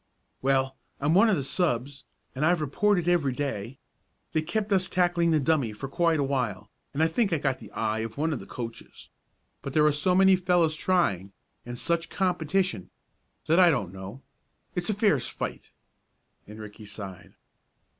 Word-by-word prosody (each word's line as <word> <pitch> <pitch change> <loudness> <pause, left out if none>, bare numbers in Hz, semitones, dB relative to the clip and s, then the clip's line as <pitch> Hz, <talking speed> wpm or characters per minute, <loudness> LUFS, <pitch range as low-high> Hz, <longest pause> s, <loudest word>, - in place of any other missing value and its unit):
"Well, 135 0 +1 0.2
I'm 145 +3 +1
one 200 +6 +6
of 205 - +3
the 140 - -2
subs, 135 -2 -1 0.3
and 135 - -3
I've 175 +2 +3
reported 175 +5 +1
every 165 -7 +2
day. 130 -3 -4 0.6
They 155 - +2
kept 205 +6 -1
us 185 -1 +1
tackling 175 -1 +2
the 160 -2 +3
dummy 140 -6 +1
for 105 +6 -6
quite 165 +2 +1
a - - +2
while, 125 -8 -2 0.2
and 150 +3 0
I - - +5
think 200 +5 0
I 165 - +2
got 135 -2 -1
the 110 - -11
eye 110 0 -1
of 110 +1 -5
one 160 +2 0
of 135 - -3
the - - -11
coaches. 115 -2 -8 0.5
But 140 - -6
there 150 -1 +4
are 150 - +5
so 150 +5 +1
many 190 0 +6
fellows 175 -3 +2
trying, 100 - 0 0.3
and 120 0 -6
such 170 +5 -1
competition, 180 - 0 0.6
that 165 +3 +3
I 180 -2 +7
don't 100 - -1
know 95 +7 -9 0.5
it's 175 +1 -2
a 215 - +1
fierce 155 - +2
fight," - - -6 0.8
and 105 +1 -11
Ricky 105 0 -10
sighed. 100 -3 -9
150 Hz, 180 wpm, -27 LUFS, 120-175 Hz, 0.8 s, I